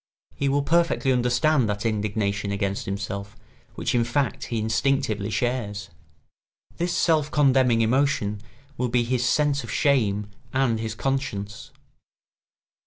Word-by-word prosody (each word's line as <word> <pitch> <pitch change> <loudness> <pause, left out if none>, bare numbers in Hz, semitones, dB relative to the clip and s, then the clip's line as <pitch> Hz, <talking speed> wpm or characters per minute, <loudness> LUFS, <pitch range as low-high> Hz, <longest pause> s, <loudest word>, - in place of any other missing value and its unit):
He 140 - -1
will 140 +1 +1
perfectly 170 -3 +2
understand 125 +1 +2
that 105 +2 -3
indignation 105 -1 -1
against 100 -1 -2
himself 100 0 -5 0.4
which - - -2
in 120 -1 +3
fact 130 +4 -1
he 115 - -3
instinctively 110 -1 0
shares. 105 -6 -2 0.9
This 175 +1 -1
self 155 -3 +2
condemning 130 -5 +3
emotion 115 -4 +1 0.4
will 125 -1 -1
be 120 0 +2
his 125 +1 0
sense 140 +2 +2
of - - -9
shame 105 -8 +1 0.2
and 130 -4 +1
his 110 0 -4
conscience. 105 -7 -3
120 Hz, 125 wpm, -24 LUFS, 105-135 Hz, 0.9 s, in